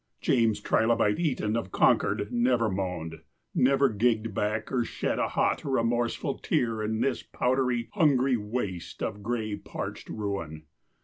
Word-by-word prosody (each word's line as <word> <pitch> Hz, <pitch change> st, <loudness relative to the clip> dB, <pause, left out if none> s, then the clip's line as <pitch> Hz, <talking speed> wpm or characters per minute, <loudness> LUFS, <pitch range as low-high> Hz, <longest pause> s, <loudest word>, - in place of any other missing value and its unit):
James 115 Hz, -3 st, +2 dB
Trilobite 110 Hz, -2 st, +2 dB
Eton 130 Hz, -10 st, 0 dB
of 115 Hz, -5 st, -3 dB
Concord 105 Hz, 0 st, +2 dB
never 120 Hz, -1 st, +2 dB
moaned, 90 Hz, -4 st, -4 dB, 0.3 s
never 135 Hz, +2 st, +4 dB
gigged 110 Hz, -1 st, +1 dB
back 105 Hz, +2 st, -1 dB
or 125 Hz, -3 st, +1 dB
shed -, -, -2 dB
a -, -, +1 dB
hot, -, -, 0 dB
remorseful 120 Hz, -3 st, 0 dB
tear 115 Hz, -3 st, 0 dB
in 110 Hz, +1 st, -1 dB
this 135 Hz, -3 st, 0 dB
powdery, 125 Hz, -2 st, 0 dB
hungry 140 Hz, -8 st, +3 dB
waste 105 Hz, -5 st, -4 dB
of 105 Hz, -1 st, -3 dB
gray, 110 Hz, -1 st, -2 dB
parched -, -, -7 dB
ruin. 95 Hz, -8 st, -4 dB
115 Hz, 135 wpm, -28 LUFS, 105-125 Hz, 0.3 s, never